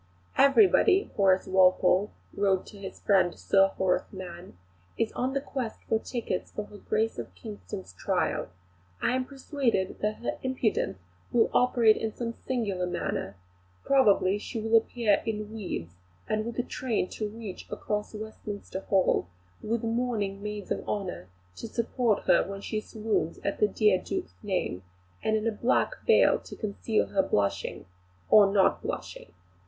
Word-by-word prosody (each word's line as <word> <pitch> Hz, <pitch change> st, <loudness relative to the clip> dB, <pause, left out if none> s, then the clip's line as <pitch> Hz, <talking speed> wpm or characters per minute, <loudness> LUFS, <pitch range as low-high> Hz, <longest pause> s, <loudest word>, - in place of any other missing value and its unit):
"Everybody," 385 Hz, +6 st, +5 dB
Horace 190 Hz, -2 st, +3 dB
Walpole 185 Hz, +1 st, +4 dB, 0.3 s
wrote 195 Hz, -2 st, +2 dB
to 205 Hz, -, -12 dB
his 195 Hz, -1 st, -8 dB
friend 190 Hz, -3 st, +3 dB
Sir 195 Hz, 0 st, +4 dB
Horace 185 Hz, -1 st, +1 dB
Mann, 180 Hz, -, -9 dB, 0.4 s
"is 225 Hz, -, 0 dB
on 255 Hz, +2 st, -2 dB
the 275 Hz, -, 0 dB
quest 260 Hz, -5 st, -5 dB
for 220 Hz, -, +2 dB
tickets 225 Hz, -6 st, -3 dB
for 210 Hz, -, -4 dB
her 205 Hz, -, -13 dB
Grace 220 Hz, -, -1 dB
of 105 Hz, -6 st, -7 dB
Kingston's 90 Hz, -1 st, -8 dB
trial. -, -, -1 dB, 0.5 s
I -, -, +1 dB
am 260 Hz, 0 st, 0 dB
persuaded 265 Hz, -8 st, -1 dB
that 210 Hz, +1 st, 0 dB
her 240 Hz, -, -4 dB
impudence 255 Hz, -, 0 dB, 0.3 s
will 235 Hz, -2 st, +3 dB
operate 235 Hz, -3 st, +4 dB
in 220 Hz, -1 st, -3 dB
some 230 Hz, -1 st, -3 dB
singular 205 Hz, -9 st, -2 dB
manner; 175 Hz, -, -3 dB, 0.5 s
probably 205 Hz, -7 st, +4 dB
she 225 Hz, +2 st, -5 dB
will 225 Hz, +1 st, +1 dB
appear 225 Hz, -2 st, +3 dB
in 215 Hz, -1 st, -4 dB
weeds, 180 Hz, -, -5 dB, 0.3 s
with 215 Hz, +2 st, -2 dB
a 245 Hz, -, +1 dB
train 240 Hz, -7 st, -1 dB
to 215 Hz, -1 st, -4 dB
reach 215 Hz, -3 st, -8 dB
across 210 Hz, +1 st, -3 dB
Westminster 210 Hz, -2 st, -6 dB
Hall, 190 Hz, -, +2 dB, 0.3 s
with 230 Hz, +1 st, -2 dB
mourning 225 Hz, -4 st, -1 dB
maids 210 Hz, -1 st, -6 dB
of -, -, -1 dB
honour 190 Hz, -, -3 dB, 0.3 s
to -, -, -6 dB
support 235 Hz, -1 st, 0 dB
her -, -, +4 dB
when 195 Hz, +1 st, -7 dB
she 215 Hz, +1 st, -3 dB
swoons 215 Hz, -7 st, -2 dB
at 200 Hz, -, -2 dB
the 210 Hz, -, +5 dB
dear 205 Hz, -2 st, +3 dB
Duke's 375 Hz, -1 st, -4 dB
name, 185 Hz, -, -2 dB, 0.4 s
and 220 Hz, -, +1 dB
in 215 Hz, -, -3 dB
a 230 Hz, -, +2 dB
black 235 Hz, -, +1 dB, 0.2 s
veil 460 Hz, -, +5 dB
to -, -, -11 dB
conceal 215 Hz, +1 st, -1 dB
her 195 Hz, -, +3 dB
blushing 100 Hz, -, -1 dB, 0.5 s
or 205 Hz, -2 st, +7 dB
not 195 Hz, -2 st, +3 dB
blushing. -, -, -6 dB
210 Hz, 155 wpm, -28 LUFS, 190-230 Hz, 0.5 s, or